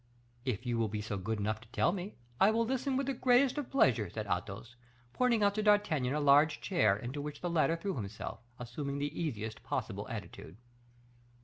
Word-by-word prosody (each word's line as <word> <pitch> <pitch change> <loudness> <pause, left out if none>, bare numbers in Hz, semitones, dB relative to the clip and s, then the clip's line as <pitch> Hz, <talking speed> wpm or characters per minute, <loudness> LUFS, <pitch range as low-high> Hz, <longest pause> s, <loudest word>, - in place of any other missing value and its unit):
"If 125 -1 -2
you 120 -1 0
will 115 - +2
be 105 0 -4
good 105 +1 -3
enough 110 +2 -2
to 120 - -16
tell 145 - +2
me, 190 +2 -5 0.2
I 195 - +6
will 230 +1 +2
listen 265 +2 -1
with 275 - 0
the 275 - -1
greatest 255 +3 +3
of 285 - -5
pleasure," 115 - +3
said 110 +4 -5
Athos, 100 +5 -4 0.4
pointing 240 -4 +2
out 200 0 +4
to 215 - -1
D'Artagnan 185 -11 +2
a - - +1
large 145 +1 +5
chair, 110 - +2
into 125 +6 -5
which 145 0 -6
the 175 - -2
latter 165 0 +3
threw 190 +4 -3
himself, 105 -3 -5 0.2
assuming 140 +4 -4
the 145 +3 -3
easiest 110 -8 -4
possible - - -4
attitude. 80 +5 -8
145 Hz, 195 wpm, -32 LUFS, -, 0.4 s, I